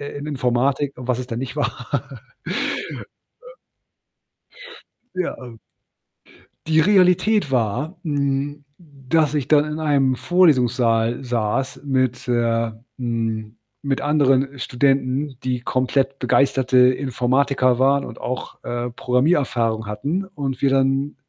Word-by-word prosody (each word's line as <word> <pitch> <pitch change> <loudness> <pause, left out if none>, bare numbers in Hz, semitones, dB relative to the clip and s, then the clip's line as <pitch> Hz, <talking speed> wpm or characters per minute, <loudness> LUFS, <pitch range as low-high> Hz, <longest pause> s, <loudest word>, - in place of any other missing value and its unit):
äh, 145 0 -7
in 145 - -7
Informatik 135 +1 0
und 125 - -8
was 125 -2 0
es 125 - -5
dann 115 -2 -4
nicht 130 0 -5
war. - - -3 1.2
Ö - - -14 1.6
Ja, 185 -1 -2
ähm 120 -3 -11 1.1
die 160 0 +3
Realität 190 0 +3
war, 125 - -1
hm, 145 -2 -2
dass 150 -1 -1
ich 145 -4 -1
dann 150 0 +4
in 150 +1 -4
einem 140 -4 +2
Vorlesungssaal 125 -9 +2
saß 120 +2 -2
mit, 130 -3 0
äh 115 -1 +1 0.3
hm, 115 -2 -3 0.3
mit 135 -1 -1
anderen, 140 -2 +2
äh, 135 - -12
Studenten, 135 +1 0
die 125 -1 -1
komplett 135 +2 0
begeisterte 130 -1 +2
Informatiker 130 0 +2
waren 135 +1 +3
und - - -10
auch, 125 - -5
äh, 120 0 -3
Programmiererfahrung 125 - 0
hatten 145 - -2
und 140 -9 -5
wir 140 - +3
dann 135 +1 +1
135 Hz, 120 wpm, -21 LUFS, 125-145 Hz, 1.6 s, dann